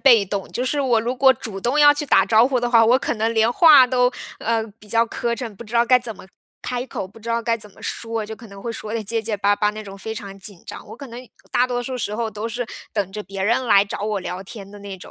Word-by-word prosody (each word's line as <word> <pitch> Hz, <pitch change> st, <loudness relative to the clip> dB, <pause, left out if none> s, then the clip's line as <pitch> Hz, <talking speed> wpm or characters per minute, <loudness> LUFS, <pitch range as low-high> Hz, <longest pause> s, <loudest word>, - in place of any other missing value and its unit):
被 235 Hz, -7 st, +6 dB
动。 195 Hz, 0 st, -4 dB
就 250 Hz, -, -2 dB
是 285 Hz, +3 st, 0 dB
我 245 Hz, -4 st, +2 dB
如 240 Hz, +3 st, -3 dB
果 265 Hz, +1 st, +6 dB
主 220 Hz, -5 st, -7 dB
动 260 Hz, +8 st, +1 dB
要 290 Hz, 0 st, +8 dB
去 290 Hz, 0 st, -3 dB
打 -, -, +5 dB
招 225 Hz, +2 st, +5 dB
呼 260 Hz, -2 st, 0 dB
的 240 Hz, 0 st, -1 dB
话， 230 Hz, -2 st, +6 dB
我 245 Hz, +3 st, +5 dB
可 -, -, -2 dB
能 225 Hz, +1 st, 0 dB
连 220 Hz, +1 st, +3 dB
话 290 Hz, -1 st, +7 dB
都， 250 Hz, 0 st, +2 dB, 0.3 s
呃， 225 Hz, 0 st, 0 dB, 0.2 s
比 210 Hz, -, -17 dB
较 230 Hz, +2 st, +3 dB
磕 235 Hz, 0 st, -2 dB
碜， 235 Hz, -4 st, -6 dB
不 235 Hz, -, -10 dB
知 220 Hz, +2 st, -10 dB
道 235 Hz, 0 st, +5 dB
该 250 Hz, +1 st, +5 dB
怎 240 Hz, -3 st, -5 dB
么 185 Hz, -, -14 dB, 0.4 s
开 250 Hz, 0 st, -3 dB
口， 190 Hz, -6 st, -5 dB
不 220 Hz, -, -16 dB
知 230 Hz, +1 st, -10 dB
道 230 Hz, 0 st, 0 dB
该 230 Hz, 0 st, +1 dB
怎 210 Hz, -2 st, -10 dB
么 -, -, -19 dB
说， 225 Hz, -1 st, -3 dB
就 220 Hz, +1 st, -7 dB
可 230 Hz, -, -13 dB
能 200 Hz, 0 st, -12 dB
会 235 Hz, -, -3 dB
说 220 Hz, -1 st, -6 dB
得 225 Hz, -1 st, -2 dB
结 225 Hz, +3 st, -1 dB
结 220 Hz, -1 st, -2 dB
巴 205 Hz, +1 st, +2 dB
巴 210 Hz, 0 st, +2 dB
那 215 Hz, +1 st, -8 dB
种 195 Hz, -1 st, -10 dB
非 220 Hz, +3 st, -6 dB
常 195 Hz, -2 st, -8 dB
紧 195 Hz, -2 st, -10 dB
张。 -, -, -9 dB
我 -, -, -10 dB
可 280 Hz, -, -9 dB
能 235 Hz, +1 st, -9 dB, 0.3 s
大 250 Hz, -, +3 dB
多 245 Hz, -1 st, -2 dB
数 255 Hz, +1 st, -4 dB
时 210 Hz, -3 st, -3 dB
候 225 Hz, 0 st, -2 dB
都 215 Hz, +2 st, -5 dB
是 245 Hz, +2 st, -3 dB, 0.3 s
等 200 Hz, -3 st, -2 dB
着 210 Hz, -, -5 dB
别 195 Hz, -1 st, -6 dB
人 235 Hz, +5 st, +1 dB
来 200 Hz, -4 st, +6 dB
找 200 Hz, -, -6 dB
我 210 Hz, -2 st, -1 dB
聊 180 Hz, 0 st, -5 dB
天 195 Hz, 0 st, -10 dB
的 205 Hz, -, -11 dB
那 200 Hz, -1 st, -7 dB
种。 -, -, -12 dB
225 Hz, 320 characters per minute, -21 LUFS, 210-245 Hz, 0.4 s, 要